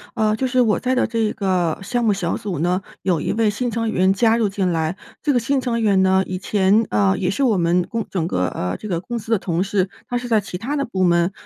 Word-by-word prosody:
呃， 215 Hz, -2 st, +2 dB
就 260 Hz, -, -2 dB
是 255 Hz, 0 st, +1 dB
我 225 Hz, -4 st, +3 dB
在 255 Hz, 0 st, -1 dB
的 255 Hz, -, +2 dB
这 225 Hz, -2 st, 0 dB
个 180 Hz, -5 st, 0 dB
项 240 Hz, +4 st, -1 dB
目 220 Hz, -, +3 dB
小 190 Hz, -4 st, -1 dB
组 195 Hz, -7 st, -4 dB
呢， 180 Hz, +4 st, +1 dB, 0.2 s
有 175 Hz, -5 st, 0 dB
一 -, -, -1 dB
位 225 Hz, -1 st, +2 dB
新 235 Hz, +3 st, -2 dB
成 230 Hz, 0 st, -1 dB
员 190 Hz, -2 st, +2 dB
加 225 Hz, +3 st, +3 dB
入 225 Hz, -3 st, +1 dB
进 195 Hz, -2 st, -1 dB
来。 160 Hz, +3 st, -1 dB, 0.3 s
这 295 Hz, -, +2 dB
个 245 Hz, -, +3 dB
新 270 Hz, +4 st, 0 dB
成 235 Hz, -2 st, -1 dB
员 200 Hz, -3 st, +3 dB
呢， 190 Hz, 0 st, +3 dB
以 185 Hz, -, -3 dB
前， 200 Hz, +3 st, +2 dB
呃， 100 Hz, -2 st, +2 dB
也 180 Hz, -, -1 dB
是 240 Hz, -, -3 dB
我 230 Hz, -6 st, +3 dB
们 175 Hz, 0 st, +2 dB
共 230 Hz, -2 st, -3 dB
整 170 Hz, -4 st, -1 dB
个 90 Hz, -, 0 dB
呃， 90 Hz, 0 st, -3 dB
这 215 Hz, -, -8 dB
个 170 Hz, -3 st, -1 dB
公 240 Hz, +7 st, -5 dB
司 225 Hz, 0 st, -7 dB
的 225 Hz, -, +3 dB
同 175 Hz, 0 st, -1 dB
事， 195 Hz, -1 st, 0 dB, 0.2 s
她 245 Hz, -, 0 dB
是 245 Hz, 0 st, -5 dB
在 220 Hz, -3 st, +3 dB
其 180 Hz, -2 st, -6 dB
他 260 Hz, +10 st, -3 dB
的 280 Hz, -, 0 dB
部 190 Hz, -8 st, 0 dB
门。 170 Hz, +1 st, +3 dB
200 Hz, 290 characters per minute, -21 LUFS, 180-230 Hz, 0.3 s, 我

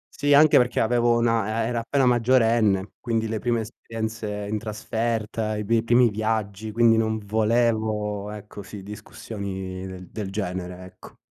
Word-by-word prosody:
Sì, 145 Hz, 0 st, 0 dB
anche 155 Hz, +1 st, +7 dB
perché 125 Hz, 0 st, +1 dB
avevo 120 Hz, +1 st, +3 dB
una 115 Hz, -1 st, +1 dB
eh, -, -, -1 dB
era 120 Hz, -1 st, -1 dB
appena 130 Hz, +3 st, +1 dB
maggiorenne, 115 Hz, -5 st, +3 dB
quindi 115 Hz, -2 st, -1 dB
le 110 Hz, -1 st, -2 dB
prime 120 Hz, -1 st, 0 dB
esperienze 110 Hz, -1 st, -5 dB
in 105 Hz, +1 st, -2 dB
trasferta, 110 Hz, 0 st, -2 dB
i 105 Hz, -, -3 dB
pi 115 Hz, +2 st, +2 dB
i 110 Hz, -, 0 dB
primi 120 Hz, 0 st, +4 dB
viaggi, 110 Hz, -1 st, -2 dB
quindi 115 Hz, 0 st, +4 dB
non 110 Hz, 0 st, +1 dB
volevo, 110 Hz, -1 st, 0 dB
ecco, 105 Hz, 0 st, -9 dB
sì, 100 Hz, 0 st, -10 dB
discussioni 95 Hz, -3 st, -7 dB
del 105 Hz, -3 st, -5 dB
genere, 90 Hz, -2 st, -4 dB
ecco. 95 Hz, -, -15 dB
110 Hz, 155 wpm, -24 LUFS, 105-115 Hz, -, anche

